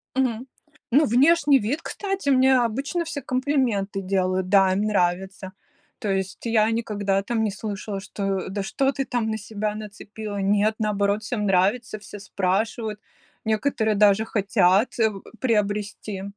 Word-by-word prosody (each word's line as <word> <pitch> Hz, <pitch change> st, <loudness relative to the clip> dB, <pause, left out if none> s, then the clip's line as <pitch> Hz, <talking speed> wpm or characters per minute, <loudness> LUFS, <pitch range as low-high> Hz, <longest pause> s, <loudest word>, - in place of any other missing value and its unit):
Мгм. 255 Hz, -2 st, 0 dB, 0.4 s
Ну, 290 Hz, +6 st, +5 dB
внешний 285 Hz, +3 st, +4 dB
вид, 255 Hz, +9 st, -2 dB
кстати, 390 Hz, -6 st, -3 dB
мне 260 Hz, -1 st, +5 dB
обычно 270 Hz, +9 st, -1 dB
все 320 Hz, -3 st, -5 dB
комплименты 255 Hz, -7 st, 0 dB
делают, 185 Hz, -1 st, 0 dB
да, 195 Hz, -1 st, +5 dB
им 195 Hz, -, 0 dB
нравится. 190 Hz, -1 st, -1 dB, 0.5 s
То 210 Hz, -, -3 dB
есть 190 Hz, -1 st, -2 dB
я 225 Hz, -2 st, +3 dB
никогда 205 Hz, -4 st, -1 dB
там 225 Hz, +2 st, -1 dB
не 215 Hz, -, 0 dB
слышала, 205 Hz, -1 st, -5 dB
что: 195 Hz, -1 st, -3 dB
"Да 200 Hz, +1 st, -3 dB
что 270 Hz, +7 st, 0 dB
ты 270 Hz, -1 st, -3 dB
там 240 Hz, -3 st, -1 dB
на 220 Hz, -, -1 dB
себя 210 Hz, 0 st, -4 dB
нацепила?" 210 Hz, 0 st, -7 dB
Нет, 205 Hz, +2 st, +2 dB
наоборот, 205 Hz, 0 st, 0 dB
всем 210 Hz, 0 st, -2 dB
нравится, 200 Hz, +4 st, +1 dB
все 205 Hz, 0 st, -10 dB
спрашивают, 210 Hz, +3 st, -2 dB, 0.5 s
некоторые 220 Hz, 0 st, +1 dB
даже 205 Hz, +1 st, +4 dB
хотят, 200 Hz, +1 st, +2 dB
э, 220 Hz, -1 st, +4 dB, 0.3 s
приобрести. 210 Hz, -3 st, -1 dB
210 Hz, 145 wpm, -24 LUFS, 195-240 Hz, 0.5 s, Ну